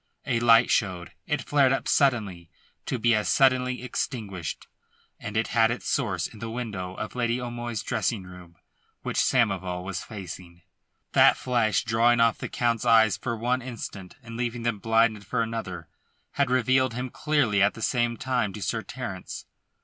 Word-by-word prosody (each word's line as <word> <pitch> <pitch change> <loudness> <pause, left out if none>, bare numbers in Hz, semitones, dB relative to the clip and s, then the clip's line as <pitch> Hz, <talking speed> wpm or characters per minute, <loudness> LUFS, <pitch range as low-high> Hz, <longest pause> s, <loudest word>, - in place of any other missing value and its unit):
A 120 - +1
light 115 0 +5
showed; 90 -5 0 0.2
it 150 - -1
flared 140 -3 +3
up 135 - -1
suddenly, 105 - +1 0.4
to 130 - -1
be 120 0 +3
as 105 -1 +1
suddenly 130 -2 +3
extinguished, 105 - -4 0.5
and 105 +1 -5
it 110 - 0
had 115 -1 +4
its 120 - -4
source - - 0
in 110 - -9
the 115 - -5
window 105 -6 -5
of - - -5
Lady 120 0 0
O'Moy's 120 -2 -4
dressing 110 -6 -1
room, 90 -2 -13 0.5
which - - -1
Samoval 95 -7 +1
was 95 -2 -4
facing. 90 -4 -9 0.5
That - - +6
flash 120 -4 +1
drawing 115 +2 +3
off 115 -1 +3
the - - -5
Count's 120 -1 0
eyes 110 -4 +5
for 120 -2 -4
one 125 +3 0
instant, 110 -6 -8
and 115 -1 -8
leaving 120 -1 -3
them 115 -3 -1
blinded 115 -1 +2
for 110 +3 -1
another, 95 -7 -5 0.4
had 140 -2 0
revealed 130 -1 +2
him 125 0 -4
clearly 145 -10 +1
at 105 +1 +3
the 115 - -9
same 120 -1 +1
time 125 -6 -1
to 105 - -8
Sir 115 - -1
Terence. 110 -7 -7
115 Hz, 170 wpm, -26 LUFS, 100-125 Hz, 0.5 s, That